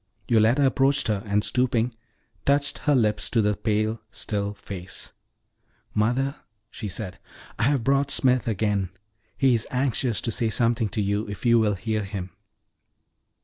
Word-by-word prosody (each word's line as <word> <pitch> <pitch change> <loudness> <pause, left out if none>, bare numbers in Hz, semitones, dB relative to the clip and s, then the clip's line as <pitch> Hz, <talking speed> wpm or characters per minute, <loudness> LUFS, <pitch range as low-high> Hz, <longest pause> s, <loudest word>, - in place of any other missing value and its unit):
Yoletta 115 +5 +4
approached 135 +1 +2
her, 105 -2 0
and, 105 +1 +1
stooping, 125 -1 +1 0.5
touched 140 0 +1
her 145 -2 +2
lips 105 -4 +1
to 115 - +1
the 105 -1 +2
pale, 110 +1 -1
still 100 0 -2
face. 95 -3 -8 0.8
"Mother," 125 +6 +1 0.3
she 105 - -6
said, 95 0 -4 0.4
"I - - +2
have 140 -3 +2
brought 140 +2 +2
Smith 130 -4 +2
again; 105 -3 0 0.5
he 135 -2 +4
is 115 -2 +1
anxious 125 -3 +1
to 115 - -2
say 115 0 +1
something 115 -1 +1
to 105 - -1
you, 100 +2 -1
if 100 +4 -7
you 115 -1 +5
will 105 -2 +2
hear 110 +3 -2
him." 95 -2 -5
110 Hz, 150 wpm, -25 LUFS, 105-130 Hz, 0.8 s, you